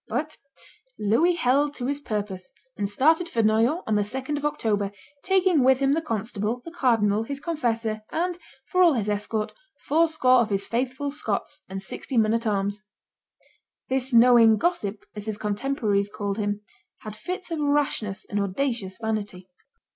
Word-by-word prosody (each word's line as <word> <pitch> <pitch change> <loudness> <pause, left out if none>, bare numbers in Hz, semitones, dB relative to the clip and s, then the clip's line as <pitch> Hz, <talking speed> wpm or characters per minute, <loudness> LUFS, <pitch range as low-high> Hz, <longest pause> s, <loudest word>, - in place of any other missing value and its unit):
But 300 +7 -3 0.6
Louis 270 - +3
held 285 -1 +2
to 245 - -4
his 285 +2 -1
purpose, 205 -8 -4 0.2
and 200 -1 -2
started 320 - +3
for 230 -7 +1
Noyon 230 - +2
on 220 - -1
the 210 - +3
2d 260 +8 -3
of 290 0 -3
October, 205 -8 0 0.3
taking 370 -6 +3
with 260 0 +5
him 275 +1 +2
the 325 - +1
constable, 225 -3 -2
the 335 - -7
cardinal, 225 -9 +2
his 275 +5 -5
confessor, 230 -8 -1
and, 350 +2 -2 0.3
for 365 - +1
all 345 -3 +6
his 215 -5 -1
escort, 210 +1 -2 0.3
fourscore 310 -5 +4
of 230 - -1
his 195 -1 -1
faithful 260 +4 -2
Scots, 295 0 -3
and 195 0 -5
sixty 250 +6 -4
men 220 -1 +4
at 230 0 0
arms. 200 0 -1 1.1
This 265 0 0
knowing 235 -2 +7
gossip, 215 - -1
as 210 0 -6
his 215 -1 -2
contemporaries 210 -1 0
called 205 0 -3
him, 205 0 -1 0.4
had 215 -1 -7
fits 365 - -6
of 325 - -2
rashness 285 -9 0
and 205 0 -2
audacious 200 -1 -2
vanity. 210 -5 -3
230 Hz, 160 wpm, -25 LUFS, 210-290 Hz, 1.1 s, knowing